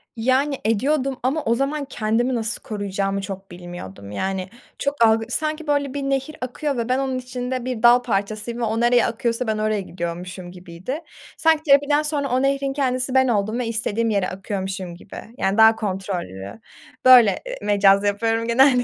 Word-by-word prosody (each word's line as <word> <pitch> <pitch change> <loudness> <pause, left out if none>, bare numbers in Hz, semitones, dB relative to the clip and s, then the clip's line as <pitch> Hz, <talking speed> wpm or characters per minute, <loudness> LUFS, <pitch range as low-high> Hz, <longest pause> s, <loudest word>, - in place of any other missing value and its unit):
Yani 260 +4 +1
ediyordum 265 +4 0
ama 280 +5 0
o 230 - +2
zaman 280 +3 -1
kendimi 240 0 0
nasıl 225 0 -2
koruyacağımı 195 -2 -2
çok 195 -1 -8
bilmiyordum. 175 - -9
Yani 190 - -3 0.3
çok 280 -5 +2
algı 225 0 +3
sanki 310 +3 -2
böyle 285 -2 0
bir 285 - -3
nehir 275 +3 -2
akıyor 255 +2 -3
ve 235 +1 -2
ben 255 +1 +2
onun 265 -1 -1
içinde 250 0 -4
bir 245 -3 -4
dal 240 +1 +7
parçasıyım 215 +2 -2
ve - - -2
o 225 0 0
nereye 240 0 +4
akıyorsa 235 +1 -2
ben 220 -1 0
oraya 215 -1 0
gidiyormuşum 175 0 -6
gibiydi. 180 - -7 0.4
Sanki 320 -1 +3
terapiden 290 0 +4
sonra 295 -2 -1
o 255 +1 +1
nehrin 275 0 0
kendisi 255 -2 -1
ben 260 0 +5
oldum 215 +1 0
ve 240 - -2
istediğim 230 0 -1
yere 200 -3 0
akıyormuşum 190 -2 -5
gibi. 190 - -13 0.2
Yani 195 +2 0
daha 220 0 +7
kontrollü. 180 - -5 0.5
Böyle, 245 -5 +7
eee, - - -5
mecaz 200 -1 +4
yapıyorum 225 +3 0
genelde. 250 +1 +4
230 Hz, 170 wpm, -22 LUFS, 195-265 Hz, 0.5 s, dal